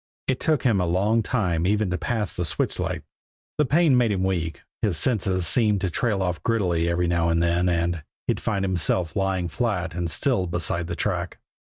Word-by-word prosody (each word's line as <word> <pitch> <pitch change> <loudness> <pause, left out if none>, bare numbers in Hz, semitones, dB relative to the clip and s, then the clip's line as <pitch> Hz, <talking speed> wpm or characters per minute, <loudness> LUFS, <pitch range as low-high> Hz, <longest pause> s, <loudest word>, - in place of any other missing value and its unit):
It 130 - 0
took 155 -6 +1
him 110 -7 +3
a 90 - 0
long 100 +6 +2
time 90 -8 0
even 105 -1 +1
to 90 - 0
pass 110 -5 -1
the 90 - -1
switch 80 - -1
light. - - -2 0.6
The 150 - +3
pain 155 0 +4
made 120 -3 +3
him 95 -2 0
weak, 85 -6 -2 0.2
his 100 -7 0
senses 95 - 0
seemed 105 +4 +2
to 95 -2 -1
trail 105 -1 0
off 90 -2 -2
giddily 90 -7 +1
every 85 +1 +1
now 85 -1 +1
and 85 0 +2
then, 85 +1 +2
and 85 -1 0 0.2
he'd - - 0
find 100 -3 -1
himself 90 -2 +1
lying 95 -2 0
flat 95 -3 -2
and 85 0 -2
still 95 - 0
beside 85 0 -2
the - - -3
track. - - -2
95 Hz, 200 wpm, -24 LUFS, 85-110 Hz, 0.6 s, pain